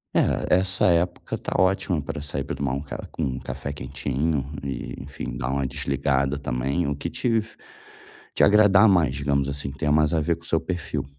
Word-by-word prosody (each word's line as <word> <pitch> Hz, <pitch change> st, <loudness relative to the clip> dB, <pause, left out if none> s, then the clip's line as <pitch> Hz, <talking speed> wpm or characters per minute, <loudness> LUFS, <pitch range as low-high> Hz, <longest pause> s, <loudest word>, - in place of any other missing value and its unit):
É, 90 Hz, -, +3 dB
essa 90 Hz, -1 st, +1 dB
época 85 Hz, +1 st, 0 dB
tá -, -, -4 dB
ótima 95 Hz, -3 st, +2 dB
pra 70 Hz, 0 st, -5 dB
sair 70 Hz, -2 st, -3 dB
pra 70 Hz, -, -4 dB
tomar 70 Hz, -2 st, -1 dB
um 70 Hz, -, -2 dB
ca 70 Hz, -, -7 dB
um 65 Hz, -5 st, -1 dB
café 70 Hz, +2 st, -5 dB
quentinho, 70 Hz, +1 st, -2 dB, 0.2 s
e, 70 Hz, -1 st, -4 dB
enfim, 65 Hz, -3 st, -6 dB
dar -, -, -3 dB
uma 70 Hz, 0 st, 0 dB
desligada 70 Hz, +1 st, 0 dB
também 70 Hz, +5 st, -1 dB
o 70 Hz, -, -1 dB
que 85 Hz, +4 st, -4 dB
te 125 Hz, -, -3 dB
f 110 Hz, +1 st, -9 dB, 0.8 s
te -, -, +4 dB
agradar 105 Hz, 0 st, +6 dB
mais, 85 Hz, -9 st, +3 dB
digamos 70 Hz, -1 st, 0 dB
assim, 70 Hz, -1 st, -3 dB
que 70 Hz, -, -14 dB
tenha 75 Hz, -, +1 dB
mais 75 Hz, +1 st, +3 dB
a 80 Hz, -, +3 dB
ver 80 Hz, +2 st, +1 dB
com 85 Hz, -, -19 dB
o -, -, -11 dB
seu 80 Hz, -1 st, +1 dB
perfil. 85 Hz, -6 st, -3 dB
70 Hz, 205 wpm, -24 LUFS, 70-85 Hz, 0.8 s, agradar